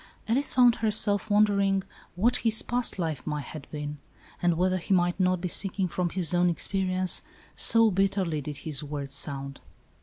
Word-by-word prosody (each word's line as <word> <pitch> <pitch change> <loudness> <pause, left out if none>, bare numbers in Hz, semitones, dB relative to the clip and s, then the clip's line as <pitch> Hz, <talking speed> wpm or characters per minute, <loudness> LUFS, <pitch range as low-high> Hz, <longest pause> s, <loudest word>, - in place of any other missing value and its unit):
Alice 260 +5 +1
found 245 -2 +5
herself 210 -2 +1
wondering 200 -2 +3 0.3
what 235 +7 +3
his 225 -1 0
past 245 -3 0
life 160 -7 -3
might 150 -1 -2
have 155 -3 -9
been, 150 -1 -6 0.4
and 175 -2 +2
whether 185 +1 +2
he 190 +3 +1
might 175 +1 +1
not 185 -1 +2
be 180 - -3
speaking 190 +1 -2
from 180 0 -2
his 180 -2 -1
own 175 0 +3
experience, 185 +1 0 0.3
so 230 -1 +4
bitterly 190 -5 0
did 145 0 -6
his 150 -3 -4
words 140 -2 -5
sound. 140 -1 -3
185 Hz, 170 wpm, -27 LUFS, 155-205 Hz, 0.4 s, found